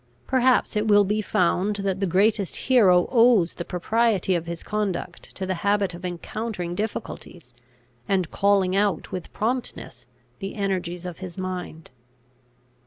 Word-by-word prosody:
Perhaps 255 -2 +2
it 210 +1 0
will 205 -1 +6
be 210 +2 0
found 185 +1 +1
that 195 -2 -2
the 195 - 0
greatest 200 +2 +2
hero 195 -9 +4
owes 230 -8 +4
the - - -5
propriety 200 +2 +1
of 170 -1 -2
his 170 -1 -6
conduct 195 -5 -4
to 190 - -4
the 185 - -1
habit 200 -2 +1
of 175 - -10
encountering 180 +1 -4
difficulties, 175 - -6 0.6
and 185 -4 +1
calling 195 -2 +2
out 200 -4 0
with 180 - -6
promptness 245 +4 -4 0.3
the 195 -1 -5
energies 185 -4 -2
of 180 -2 -7
his 185 -1 -8
mind. 180 -5 -6
195 Hz, 145 wpm, -24 LUFS, 180-210 Hz, 0.6 s, will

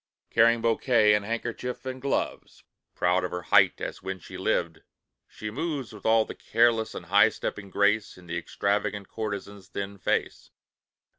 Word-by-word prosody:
Carrying 115 0 +4
bouquet, 115 -2 +4
and 105 -1 +2
handkerchief, 115 +4 -4
and 130 0 -5
gloves, 140 +1 -3 0.3
Proud 90 +1 +2
of 90 - -1
her 90 0 -5
height - - +4
as - - -5
when 95 0 -4
she - - -11
lived, 85 -2 -1 0.5
she 105 0 -7
moves 145 -2 -3
With 105 - -6
all 110 0 +5
the - - -7
careless 115 -1 +2
and 85 - -7
high 100 +5 +5
stepping 100 -2 -5
grace, 100 +2 +1
And 90 -1 -15
the 85 - -4
extravagant 100 +3 -1
courtesan's 100 -3 -5
thin 100 0 -6
face. - - -1
105 Hz, 160 wpm, -27 LUFS, 100-115 Hz, 0.5 s, all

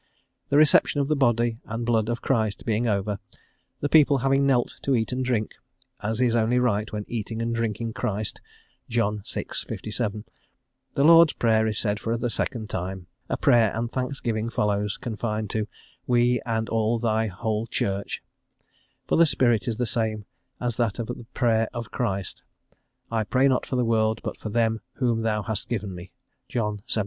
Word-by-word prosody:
The 140 - +3
reception 150 -1 +5
of 140 0 0
the 155 - +3
Body 120 -4 +2
and 115 +1 -4
Blood 115 -2 +2
of 120 0 -3
Christ 110 -6 0
being 115 +1 +1
over, 100 -1 0 0.6
the 145 - +1
people 145 -2 +5
having 135 +1 +3
knelt 125 -3 +1
to 140 - +1
eat 110 0 0
and 130 +1 -1
drink, 120 -4 -1 0.5
as 110 +2 -2
is 120 -2 +3
only 115 +2 +2
right 110 -3 +1
when 105 -1 -4
eating 115 -1 -4
and 115 0 -1
drinking 115 0 -2
Christ 105 0 -3 0.5
(John 105 -3 0
vi. - - -2
57), 110 -1 -3 0.7
the 140 - +3
Lord's 165 0 +8
Prayer 110 -1 +2
is 110 - -1
said 105 -2 0
for 115 +2 -1
the 120 0 -2
second 110 0 -2
time, 95 -1 -4 0.2
a - - 0
prayer 115 -4 +4
and 115 +1 -2
thanksgiving 120 -4 -2
follows, 105 -2 0
confined 110 -2 -3
to 110 -1 -1 0.4
"we 120 0 +3
and 110 -1 0
all 115 +1 +1
thy 110 -1 +1
whole 110 +3 -2
Church," 100 -3 -2 0.8
for - - +1
the 170 0 +6
spirit 120 -6 +2
is 115 -2 -1
the 125 - 0
same 110 -3 -1 0.3
as 120 -2 -2
that 115 -4 0
of 115 - -2
the 120 0 -7
prayer 115 -2 +2
of 115 -2 -5
Christ, 100 -6 -2 0.7
"I 115 -1 +1
pray 130 +5 +3
not 130 -2 +1
for - - -2
the 125 -1 +2
world, 110 -1 +2
but - - -3
for 110 - -5
them 115 0 +1
whom 120 -4 0
thou 105 -2 0
hast 110 -1 -2
given 105 -5 -2
me" 90 +1 -9 0.4
(John 105 -4 -2
xvii. - - 0
115 Hz, 180 wpm, -25 LUFS, 110-120 Hz, 0.8 s, Lord's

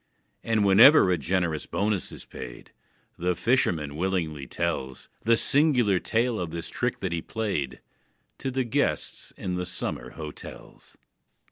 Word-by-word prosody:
And, 110 -2 +1
whenever 100 +2 +8
a 90 - +2
generous 85 -1 -1
bonus 105 -2 -1
is - - -10
paid, - - -10 0.5
The 90 +1 0
fisherman 85 - +1
willingly 80 -5 -2
tells 65 +1 -3 0.2
The 115 0 +5
singular 125 - +3
tale 115 +2 0
of 90 -2 -3
this 85 0 -5
trick - - -2
that 95 - -2
he 85 -1 -1
played, 80 - -3 0.6
To 135 - -2
the 130 0 0
guests 130 +4 -2
in 90 -1 -3
the 90 - -2
summer - - -4
hotels. 75 -2 -10
95 Hz, 140 wpm, -26 LUFS, 80-115 Hz, 0.6 s, whenever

